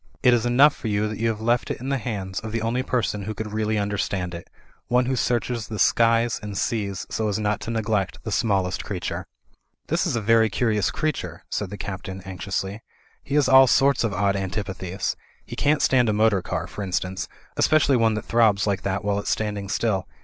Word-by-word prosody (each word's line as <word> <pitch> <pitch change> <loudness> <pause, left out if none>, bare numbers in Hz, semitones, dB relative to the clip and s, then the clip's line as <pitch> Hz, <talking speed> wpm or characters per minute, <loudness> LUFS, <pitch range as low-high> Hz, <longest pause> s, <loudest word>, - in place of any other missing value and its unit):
It 125 -2 +6
is 120 0 +2
enough 140 +5 +5
for - - -6
you 105 0 +1
that 110 0 -5
you 115 - +1
have 110 -1 -2
left 120 +2 +1
it - - -3
in 130 +3 -5
the 135 -1 0
hands 100 -6 -4
of 110 - -7
the 115 0 -2
only 120 +3 0
person 120 -5 -1
who 105 +2 -5
could 105 0 -5
really 110 0 0
understand 100 -3 -2
it; 85 0 -8 0.4
one 125 +1 +3
who 130 +1 0
searches 120 -2 -1
the 110 - -5
skies 115 +2 +3
and 105 -2 -6
seas 100 -4 -2
so 110 - -1
as 105 - 0
not 105 -1 0
to - - -6
neglect 110 -4 -1
the 110 - -4
smallest 95 -3 0
creature." - - -4 0.6
"This - - +1
is - - -1
a - - +1
very 110 +1 +4
curious 105 -1 +1
creature," 90 - -3
said 105 - -2
the 100 - -7
Captain, 95 -1 -6
anxiously, 95 +2 -4 0.4
"he 140 - -4
has 145 -2 +4
all 130 0 +8
sorts 135 +1 +3
of 115 - 0
odd 100 +1 +1
antipathies. 95 -1 -3 0.3
He - - -7
can't 145 +1 +2
stand 125 -3 +4
a - - +2
motor 105 -2 +3
car, - - -3
for - - -8
instance, 95 -1 -2 0.3
especially 155 -3 +3
one 115 -2 +3
that 110 - -4
throbs 110 -3 +3
like 100 -2 0
that 100 +1 -2
while 100 0 +1
it's - - -4
standing 105 -2 -2
still. 95 -4 0
110 Hz, 215 wpm, -24 LUFS, 100-115 Hz, 0.6 s, all